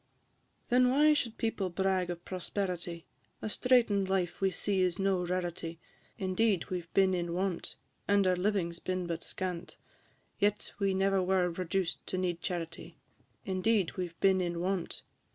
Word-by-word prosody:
Then 250 Hz, +1 st, +5 dB
why 300 Hz, +4 st, +5 dB
should 235 Hz, -6 st, -1 dB
people 220 Hz, -4 st, -1 dB
brag 185 Hz, 0 st, 0 dB
of 175 Hz, 0 st, -5 dB
prosperity? 180 Hz, -2 st, -3 dB, 0.3 s
A -, -, -4 dB
straiten'd 215 Hz, -4 st, +3 dB
life 185 Hz, -2 st, 0 dB
we 195 Hz, -, +4 dB
see 190 Hz, +2 st, 0 dB
is 180 Hz, -1 st, +1 dB
no 195 Hz, -2 st, +1 dB
rarity; 175 Hz, -2 st, -3 dB, 0.4 s
Indeed, 190 Hz, 0 st, +1 dB
we 180 Hz, -1 st, -1 dB
've 165 Hz, -, -23 dB
been 190 Hz, -1 st, +5 dB
in 175 Hz, -1 st, -1 dB
want, 185 Hz, -1 st, -2 dB, 0.3 s
And 200 Hz, -1 st, +4 dB
our 185 Hz, -1 st, +4 dB
living 180 Hz, -2 st, 0 dB
's 170 Hz, -, -10 dB
been 185 Hz, 0 st, -2 dB
but 170 Hz, -1 st, -3 dB
scant, 180 Hz, -2 st, -5 dB, 0.6 s
Yet 205 Hz, 0 st, +1 dB
we 195 Hz, -2 st, +2 dB
never 195 Hz, 0 st, +3 dB
were 180 Hz, -1 st, +2 dB
reduced 180 Hz, +1 st, -2 dB
to 185 Hz, -, -2 dB
need 175 Hz, -2 st, -1 dB
charity; 170 Hz, -2 st, -4 dB, 0.5 s
Indeed, 190 Hz, 0 st, +1 dB
we 180 Hz, -1 st, -2 dB
've 170 Hz, -, -19 dB
been 190 Hz, -1 st, +4 dB
in 175 Hz, -1 st, -2 dB
want, 185 Hz, 0 st, -1 dB
&c. -, -, -6 dB
185 Hz, 170 wpm, -31 LUFS, 175-195 Hz, 0.6 s, Then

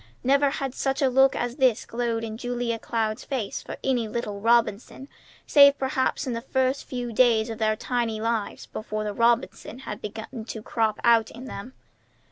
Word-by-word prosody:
Never 280 Hz, +2 st, +4 dB
had 270 Hz, -1 st, -3 dB
such 270 Hz, +2 st, -1 dB
a 265 Hz, -, +4 dB
look 265 Hz, +1 st, +5 dB
as 245 Hz, +1 st, -3 dB
this 255 Hz, -5 st, +2 dB
glowed 230 Hz, -1 st, -2 dB
in 220 Hz, -1 st, -5 dB
Julia 240 Hz, -1 st, -2 dB
Cloud's 220 Hz, -1 st, -2 dB
face 250 Hz, -8 st, -3 dB
for -, -, -8 dB
any 250 Hz, -4 st, +1 dB
little 210 Hz, -2 st, -4 dB
Robinson, 235 Hz, +3 st, +1 dB, 0.4 s
save 280 Hz, -1 st, +7 dB
perhaps 265 Hz, +2 st, -1 dB
in 255 Hz, -, -2 dB
the 230 Hz, -, -3 dB
first 260 Hz, +1 st, 0 dB
few 245 Hz, -2 st, -5 dB
days 230 Hz, -1 st, +3 dB
of 225 Hz, -, -7 dB
their 215 Hz, -1 st, +2 dB
tiny 230 Hz, -1 st, -2 dB
lives 225 Hz, -1 st, -2 dB
before 215 Hz, 0 st, -5 dB
the 210 Hz, -1 st, -3 dB
Robinson 235 Hz, +1 st, 0 dB
had 210 Hz, -, -6 dB
begun 220 Hz, +2 st, -7 dB
to 220 Hz, -, -6 dB
crop 220 Hz, -2 st, 0 dB
out 230 Hz, -2 st, +4 dB
in 250 Hz, +2 st, -10 dB
them. 250 Hz, +1 st, -8 dB
235 Hz, 180 wpm, -25 LUFS, 220-260 Hz, 0.4 s, save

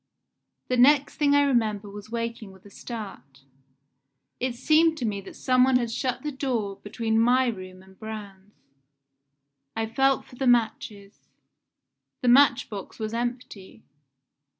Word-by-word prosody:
"The 255 Hz, -, 0 dB
next 280 Hz, +3 st, +4 dB
thing 285 Hz, -1 st, +3 dB
I 285 Hz, -, +5 dB
remember 220 Hz, -6 st, 0 dB
was 205 Hz, +1 st, -10 dB
waking 230 Hz, -2 st, -5 dB
with 190 Hz, 0 st, -19 dB
a 205 Hz, -, -14 dB
start. 190 Hz, -, -9 dB, 1.0 s
It 250 Hz, -1 st, -2 dB
seemed 320 Hz, +5 st, +3 dB
to 250 Hz, -, -3 dB
me 200 Hz, -2 st, -2 dB
that 195 Hz, -, -12 dB
some 255 Hz, -1 st, +2 dB
one 260 Hz, 0 st, +3 dB
had 240 Hz, -2 st, +1 dB
shut 250 Hz, +1 st, -3 dB
the 300 Hz, -, -3 dB
door 240 Hz, -8 st, -3 dB
between 220 Hz, +1 st, -2 dB
my 250 Hz, +3 st, +4 dB
room 185 Hz, -5 st, -6 dB
and 190 Hz, 0 st, -20 dB
Braun's. 205 Hz, -2 st, -10 dB, 1.1 s
I 225 Hz, 0 st, -1 dB
felt 270 Hz, +4 st, +1 dB
for 250 Hz, -, -16 dB
the 265 Hz, -, -1 dB
matches. 220 Hz, -4 st, -1 dB, 0.9 s
The 250 Hz, -, +2 dB
match 260 Hz, 0 st, +5 dB
box 200 Hz, -3 st, -8 dB
was 220 Hz, 0 st, -4 dB
empty. 235 Hz, -4 st, -5 dB
230 Hz, 150 wpm, -25 LUFS, 205-255 Hz, 1.1 s, I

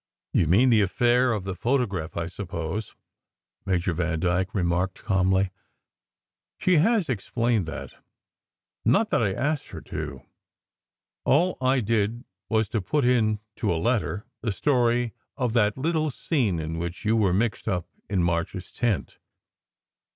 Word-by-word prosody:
"You 80 Hz, -, +3 dB
mean 120 Hz, +10 st, +5 dB
the 110 Hz, -2 st, +5 dB
affair 120 Hz, +6 st, +3 dB
of 105 Hz, -4 st, -1 dB
the 95 Hz, 0 st, -3 dB
photograph, 100 Hz, -, -1 dB
I 85 Hz, -, -1 dB
suppose," 90 Hz, +2 st, -5 dB, 0.7 s
Major 90 Hz, -2 st, +1 dB
Vandyke 90 Hz, +3 st, 0 dB
remarked 90 Hz, 0 st, 0 dB
calmly. 95 Hz, 0 st, +2 dB, 1.1 s
"She 185 Hz, -2 st, +3 dB
has 205 Hz, +2 st, +3 dB
explained 115 Hz, -, 0 dB
that. 80 Hz, -, -6 dB, 0.9 s
Not 210 Hz, -, +3 dB
that -, -, +3 dB
I 100 Hz, -4 st, +2 dB
asked 145 Hz, +8 st, -1 dB
her -, -, -8 dB
to. 75 Hz, -4 st, -6 dB, 1.0 s
All 175 Hz, +6 st, +3 dB
I 130 Hz, 0 st, +3 dB
did 110 Hz, +1 st, 0 dB, 0.3 s
was 110 Hz, -1 st, +2 dB
to 110 Hz, -, -1 dB
put 135 Hz, +9 st, 0 dB
in 110 Hz, -4 st, +2 dB, 0.2 s
to -, -, 0 dB
a 85 Hz, -, +1 dB
letter 110 Hz, +1 st, 0 dB, 0.2 s
the 115 Hz, -, -1 dB
story 120 Hz, 0 st, +1 dB, 0.2 s
of 125 Hz, -3 st, 0 dB
that 105 Hz, -2 st, +2 dB
little 155 Hz, +2 st, 0 dB
scene 125 Hz, -, 0 dB
in 80 Hz, +1 st, -3 dB
which 85 Hz, +5 st, -5 dB
you 110 Hz, +2 st, +3 dB
were 105 Hz, -5 st, +3 dB
mixed 105 Hz, +5 st, 0 dB
up 90 Hz, -2 st, 0 dB, 0.2 s
in 95 Hz, -4 st, +1 dB
March 85 Hz, +2 st, 0 dB
s 90 Hz, -2 st, -8 dB
tent. 115 Hz, -6 st, -1 dB
105 Hz, 145 wpm, -26 LUFS, 90-125 Hz, 1.1 s, mean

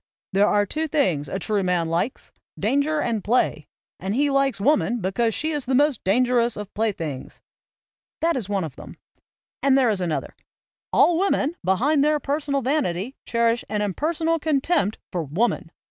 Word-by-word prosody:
"There 200 Hz, +2 st, +4 dB
are 205 Hz, -1 st, +3 dB
two 315 Hz, +10 st, -2 dB
things 180 Hz, -, 0 dB
a 190 Hz, -, -2 dB
true 205 Hz, +1 st, -1 dB
man 180 Hz, -3 st, 0 dB
likes, 170 Hz, +10 st, -2 dB, 0.3 s
danger 290 Hz, +3 st, +1 dB
and 225 Hz, -7 st, -1 dB
play; 245 Hz, +4 st, +1 dB, 0.3 s
and 195 Hz, +3 st, -2 dB
he 285 Hz, +2 st, +2 dB
likes 275 Hz, -5 st, +1 dB
woman 245 Hz, 0 st, +2 dB
because 220 Hz, +4 st, 0 dB
she 315 Hz, +1 st, -1 dB
is 295 Hz, -3 st, -3 dB
the 260 Hz, +1 st, 0 dB
most 290 Hz, -2 st, +2 dB
danger 245 Hz, +5 st, +3 dB
ous 235 Hz, 0 st, 0 dB
of 210 Hz, -1 st, -7 dB
playthings." 170 Hz, -11 st, -3 dB, 0.8 s
That 335 Hz, +1 st, +1 dB
is 225 Hz, -7 st, -3 dB
one 200 Hz, -2 st, 0 dB
of 150 Hz, -5 st, -6 dB
them, -, -, -11 dB, 0.6 s
and 275 Hz, -1 st, +4 dB
there 250 Hz, -4 st, +4 dB
is 200 Hz, -3 st, -2 dB
another: 170 Hz, -3 st, -3 dB, 0.6 s
"All 345 Hz, -1 st, +4 dB
women 345 Hz, -5 st, +1 dB
behind 260 Hz, -, +2 dB
their 300 Hz, 0 st, +2 dB
per 290 Hz, +1 st, -1 dB
sonal 280 Hz, -3 st, -1 dB
vanity 255 Hz, -, -1 dB
cherish 230 Hz, 0 st, +1 dB
an 210 Hz, 0 st, -1 dB
impersonal 320 Hz, -, 0 dB
contempt 290 Hz, -, +1 dB
for 175 Hz, -, -1 dB
Woman." 180 Hz, -, -1 dB
240 Hz, 175 wpm, -23 LUFS, 195-290 Hz, 0.8 s, There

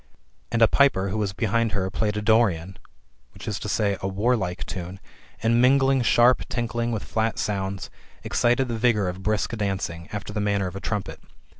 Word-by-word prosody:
And 115 Hz, -1 st, +3 dB
a -, -, +8 dB
piper 110 Hz, -9 st, +3 dB
who 110 Hz, +3 st, -2 dB
was 100 Hz, -2 st, -1 dB
behind 115 Hz, +1 st, 0 dB
her 95 Hz, -2 st, -1 dB
played 105 Hz, +1 st, -1 dB
a 105 Hz, -, -2 dB
Dorian 95 Hz, -5 st, +2 dB, 0.6 s
[t\e. 100 Hz, +3 st, -5 dB
sl 105 Hz, 0 st, -1 dB
warlike] 95 Hz, -2 st, -1 dB
tune, 90 Hz, 0 st, -6 dB, 0.4 s
and, 115 Hz, +1 st, +3 dB
mingling 135 Hz, +1 st, +4 dB
sharp 120 Hz, +1 st, +4 dB
tinkling 120 Hz, -1 st, -2 dB
with 110 Hz, -3 st, -3 dB
flat 110 Hz, 0 st, -1 dB
sounds, 100 Hz, -1 st, -3 dB, 0.3 s
excited 120 Hz, +2 st, +1 dB
the 115 Hz, -2 st, -3 dB
vigour 110 Hz, -5 st, +2 dB
of 90 Hz, +1 st, -7 dB
brisk 105 Hz, +3 st, -1 dB
dancing, 95 Hz, -5 st, -3 dB
after 105 Hz, 0 st, -5 dB
the 105 Hz, -, -1 dB
manner 100 Hz, -1 st, 0 dB
of 90 Hz, 0 st, -5 dB
a 100 Hz, -, -6 dB
trumpet. 100 Hz, -3 st, -3 dB
105 Hz, 170 wpm, -24 LUFS, 95-115 Hz, 0.6 s, a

